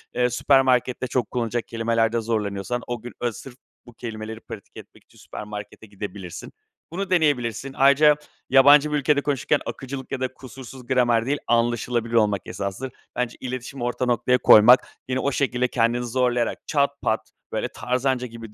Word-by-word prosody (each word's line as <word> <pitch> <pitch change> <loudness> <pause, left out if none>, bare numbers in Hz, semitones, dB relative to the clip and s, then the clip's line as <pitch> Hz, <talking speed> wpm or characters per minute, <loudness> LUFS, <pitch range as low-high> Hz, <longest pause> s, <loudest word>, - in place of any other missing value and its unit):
eee, 125 0 +2
süpermarkette 130 0 +2
çok 125 -3 -1
kullanılacak 120 -1 -2
kelimelerde 115 0 0
zorlanıyorsan 110 +1 -2
o 120 -2 -4
gün, 120 - -9
eee, 120 - +1
sırf 120 +5 -11 0.3
bu 120 - -14
kelimeleri 110 -1 -7
pratik 105 -3 -11
etmek - - -14
için - - -24
süpermarkete 105 +1 -9
gidebilirsin. 100 -3 -8 0.4
Bunu 195 +2 -3
deneyebilirsin. 135 - 0
Ayrıca 140 +2 +6 0.3
yabancı 145 +3 +6
bir 150 - +1
ülkede 145 0 +2
konuşurken 145 +1 0
akıcılık 130 0 -7
ya 135 - -2
da 130 0 -2
kusursuz 130 -1 -11
gramer 120 -3 +2
değil, 145 +3 0
anlaşılabilir 120 0 0
olmak 105 -4 +3
esastır. 100 +7 -5 0.2
Bence 125 -1 -2
iletişimi 130 0 -6
orta 120 +1 -1
noktaya 125 +1 +2
koymak, 120 +2 +7 0.2
yine 130 0 -1
o 140 +2 0
şekilde 125 -2 0
kendini 120 0 +1
zorlayarak 120 -1 -1
çat 140 -2 +2
pat, - - -1 0.2
böyle, - - -2
tarzanca 125 +1 -1
gibi 115 -2 -11
125 Hz, 155 wpm, -23 LUFS, 115-130 Hz, 0.4 s, koymak